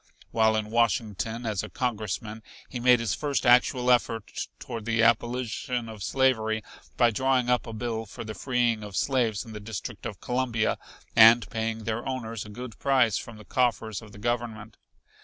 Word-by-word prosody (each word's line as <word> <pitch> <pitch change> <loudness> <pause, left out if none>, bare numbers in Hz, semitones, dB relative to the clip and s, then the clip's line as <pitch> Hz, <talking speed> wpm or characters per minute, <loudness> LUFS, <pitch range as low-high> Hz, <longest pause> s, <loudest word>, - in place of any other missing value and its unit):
While 110 -1 +3
in 110 0 -2
Washington 115 0 0
as 105 -4 -1
a - - -7
congressman, 110 -2 -3 0.3
he 125 - -6
made 125 0 +5
his 115 -2 -1
first 145 -2 -1
actual 125 0 +4
effort 115 -3 0
toward 115 -2 -7
the 115 0 +2
abolition 120 +1 0
of 110 -2 -9
slavery 110 -2 +1 0.3
by 120 -2 +5
drawing 130 +1 +1
up 125 - +1
a - - -5
bill 115 -1 -3
for 115 +4 -8
the 110 -1 -6
freeing 120 -3 0
of 105 -2 -8
slaves 120 -5 +1
in 110 - -10
the 105 - -6
District 105 -1 -6
of - - -8
Columbia 125 -3 0 0.4
and 115 +1 +8
paying 110 -1 -2
their 115 +2 -2
owners 115 -5 -4
a - - -10
good 120 +2 -8
price 130 -6 +3
from 115 -2 -9
the 105 - -13
coffers 115 -3 0
of 110 -2 -13
the - - -13
Government. 115 -1 -3
115 Hz, 175 wpm, -27 LUFS, 110-125 Hz, 0.4 s, and